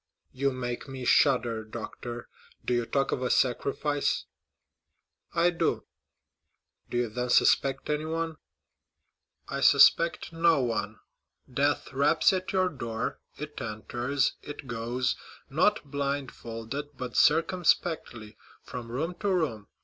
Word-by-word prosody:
"You 140 +2 0
make 125 0 -4
me 130 -2 -6
shudder, 120 -6 +3
doctor. 115 +2 -7 0.4
Do - - +1
you 120 -1 0
talk 135 -1 0
of - - -1
a 125 - 0
sacrifice?" 140 +3 +1 1.1
"I 170 +1 +4
do." 170 - 0 1.0
"Do 120 - -2
you 120 0 +1
then 125 +3 -3
suspect 135 +2 +3
anyone?" 160 +2 -2 1.1
"I 140 0 -3
suspect 160 +5 +5
no 165 -2 +4
one; 110 -3 -2 0.5
death 140 +2 0
raps 145 +6 +4
at 185 0 -2
your 185 -1 +2
door—it 130 +2 -6
enters—it 125 +6 -2
goes, 125 +1 -1 0.3
not 175 +4 +2
blindfolded, 140 -1 -4
but 125 -2 -5
circumspectly, 160 - +2 0.3
from 120 -2 -7
room 160 +8 -2
to 205 - 0
room. 145 - -1
135 Hz, 110 wpm, -28 LUFS, 120-155 Hz, 1.1 s, suspect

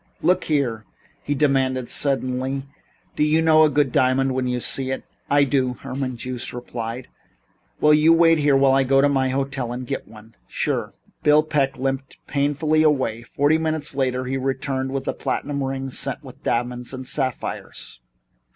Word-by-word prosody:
"Look 180 - +2
here," 130 -8 0 0.4
he 145 - -2
demanded 130 -3 +1
suddenly, 135 -1 0 0.5
"do - - -3
you 150 +1 +3
know 160 -1 +5
a 155 - +6
good 145 -3 +1
diamond 130 +1 +2
when 130 0 -1
you 125 0 -1
see 130 +2 +1
it?" 130 - -3 0.3
"I 145 0 +4
do," 130 -2 +1
Herman 130 -1 -5
Joost 125 +1 -5
replied. 120 0 -6 0.7
"Will 150 0 +5
you 155 +2 +5
wait 165 -1 +5
here 145 -1 +3
until 135 0 +4
I 135 - +4
go 135 +1 +3
to 140 - +5
my 135 -2 +1
hotel 135 -2 -2
and 125 +1 -5
get - - -4
one?" 110 +1 -15
"Sure." - - -2 0.3
Bill 150 +1 +5
Peck 140 -3 0
limped 135 +1 -3
painfully 145 +2 +1
away. 130 -7 +1
Forty 145 +6 +1
minutes 155 -2 -2
later 130 -2 -1
he 135 +1 -2
returned 135 0 -2
with 135 0 -4
a - - 0
platinum 140 -1 -3
ring 135 0 -3
set - - -2
with - - -13
diamonds 125 +1 -2
and 130 0 -7
sapphires. 130 - -4
135 Hz, 170 wpm, -22 LUFS, 130-145 Hz, 0.7 s, a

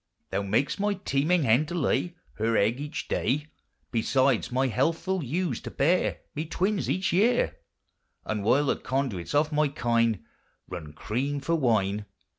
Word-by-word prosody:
Thou 100 - 0
mak'st 110 - 0
my 205 0 +1
teeming 165 -1 +1
hen 130 +5 +3
to 175 - -4
lay 175 +2 0 0.2
Her 115 +1 +2
egg 110 +6 +2
each 150 +2 -5
day, 145 +5 0 0.4
Besides 130 +2 +2
my 130 +2 +2
healthful 165 - 0
ewes 150 0 -1
to - - -6
bear 170 +6 +1
Me 150 - -2
twins 190 +4 0
each 185 -1 0
yeare; 225 +7 +3 0.7
The 110 - -1
while 120 +8 +3
the - - +1
conduits 130 -6 -2
of 150 +2 +3
my 150 0 +3
kine 115 - +1 0.4
Run 80 -5 -7
creame 130 - -2
for 155 +5 -1
wine. 105 -8 +1
140 Hz, 155 wpm, -27 LUFS, 115-165 Hz, 0.7 s, hen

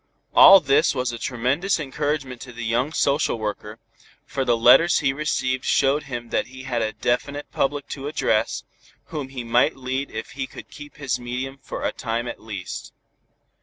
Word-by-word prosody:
All 195 0 +10
this 145 0 +3
was 125 -2 -1
a 120 - -7
tremendous 135 - 0
encouragement 145 -3 -3
to 125 - -9
the 120 -1 -6
young 120 +6 0
social 140 -4 +1
worker, 105 0 -5 0.5
for 135 -1 -2
the 120 -2 +2
letters 130 +9 +6
he 135 - +1
received 130 -3 -1
showed 140 +2 +2
him 120 -4 -6
that - - 0
he 130 +1 -11
had 125 -3 -2
a 110 -1 -1
definite 140 +4 -2
public 145 +1 -1
to 140 0 -5
address, 110 -7 0 0.5
whom 145 -4 -4
he 130 -2 -6
might 120 +3 +2
lead 130 +1 -3
if 110 +1 -6
he 130 -1 -4
could - - -12
keep 145 0 -11
his 130 -4 -2
medium 130 +3 -5
for - - -6
a - - +1
time 120 0 -3
at - - -7
least. 100 -5 -7
130 Hz, 180 wpm, -23 LUFS, 120-140 Hz, 0.5 s, All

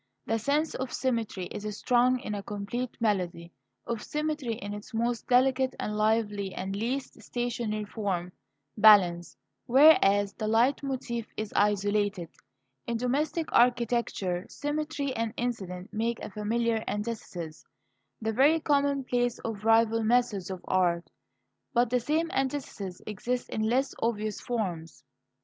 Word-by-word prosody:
The 225 0 0
sense 290 +7 0
of 260 -1 -4
symmetry 230 -7 -1
is 210 0 -5
strong 250 +1 +3
in 210 - -4
a 205 - -3
complete 205 +5 -4
melody 180 -6 -1 0.3
of 230 -2 -3
symmetry 300 -5 -2
in 205 -2 -6
its 205 +2 -8
most 235 +1 -1
delicate 260 +1 +3
and 210 - -2
lively 210 -2 0
and 190 +1 -4
least 250 +6 -3
stationary 235 -3 -2
form 190 -5 -3 0.4
balance; 190 -5 +5 0.3
whereas 205 -8 +6
the 215 - -4
leit 230 +5 +3
motif 250 -4 -3
is 215 -1 -4
isolated. 205 -3 +1 0.6
In 235 -1 -1
domestic 290 +7 -1
architecture 235 -7 +2
Symmetry 290 -1 -2
and 230 0 -2
Incident 190 -7 -4
make 230 +2 -1
a - - -6
familiar 225 +2 0
antithesis 205 -7 -5 0.6
the 220 0 -2
very 290 +7 +5
commonplace 275 -5 +1
of 215 -3 -4
rival 225 0 +4
methods 220 -5 +1
of 185 -2 -6
art. 175 -2 +1 0.6
But 240 0 +3
the 250 - +3
same 315 +6 0
antithesis 260 -9 -3
exists 245 +4 -3
in 215 - -2
less 265 +3 +1
obvious 215 -2 -1
forms. 180 - -4
225 Hz, 130 wpm, -28 LUFS, 205-250 Hz, 0.6 s, whereas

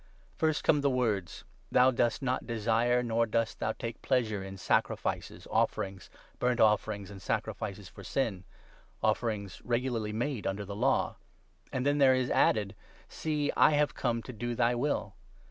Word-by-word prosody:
"' - - -31
First 155 -2 +1
come 150 -2 +4
the 140 - +3
words 110 -8 -1
— - - -31
' - - -33
Thou 125 +1 +6
dost 120 +1 0
not 130 -1 -1
desire, 115 +2 +2
nor 115 0 +1
dost 115 0 0
8 - - -33
thou 110 - 0
take 115 0 -6
pleasure 110 -6 0
in, 95 0 -8
sacrifices, 95 - -1
offerings, 95 -2 -1 0.3
burnt 125 0 +1
offerings, 105 -2 +2
and 95 -1 -10
sacrifices 100 +1 -3
for - - -12
sin 110 -9 -1 0.3
' - - -30
(offerings 110 -2 -1
regularly 120 -3 -1
made 120 +1 -2
under 100 +1 -2
the 100 +1 -6
Law), 125 +6 +1 0.5
and 130 0 -2
then 145 +1 +2
there 130 -2 +6
is 130 -1 0
added 105 -2 +3 0.2
— - - -27
'See, 150 -2 -1
I - - +6
have 145 0 +2
come 115 -2 -1
to 130 - -8
do 120 +2 -3
thy 120 0 +3
9 120 - -2
will.' 145 +3 -1
115 Hz, 185 wpm, -30 LUFS, 105-130 Hz, 0.5 s, Thou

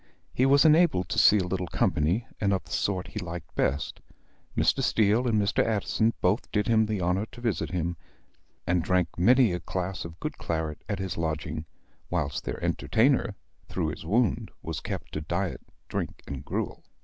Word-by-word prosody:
He 130 - +3
was 140 +3 +6
enabled 155 - +4
to - - +1
see 105 - +7
a 95 - +1
little 90 0 -2
company 85 +9 +1
and 100 -1 +2
of 95 - -1
the - - -15
sort 95 -2 -1
he 105 - -5
liked 85 -3 -7
best. 70 +3 -1 0.6
Mr. - - +3
Steele 110 +3 +3
and 110 -3 +3
Mr. 100 +1 +2
Addison 110 +1 +1
both 95 +6 +1
did 105 -2 +1
him 110 -1 +4
the 105 -2 -1
honor 90 +4 0
to - - -11
visit 100 -10 -1
him; 85 -1 -1 0.7
and 90 0 +2
drank 90 -1 +1
many 120 +1 +5
a 90 - -2
glass 90 +2 -3
of 85 0 -9
good - - -5
claret 80 -2 -3
at 100 - -1
his 95 -2 -4
lodging, 80 -1 -3 0.4
whilst 75 -6 -2
their - - -3
entertainer, 115 -3 +2 0.3
through 80 - -1
his 80 - -6
wound, 110 +6 +1
was - - -3
kept - - -5
to 75 - -3
diet 85 +4 -2 0.3
drink - - -4
and 70 -1 -6
gruel. - - -3
95 Hz, 185 wpm, -27 LUFS, 85-110 Hz, 0.7 s, see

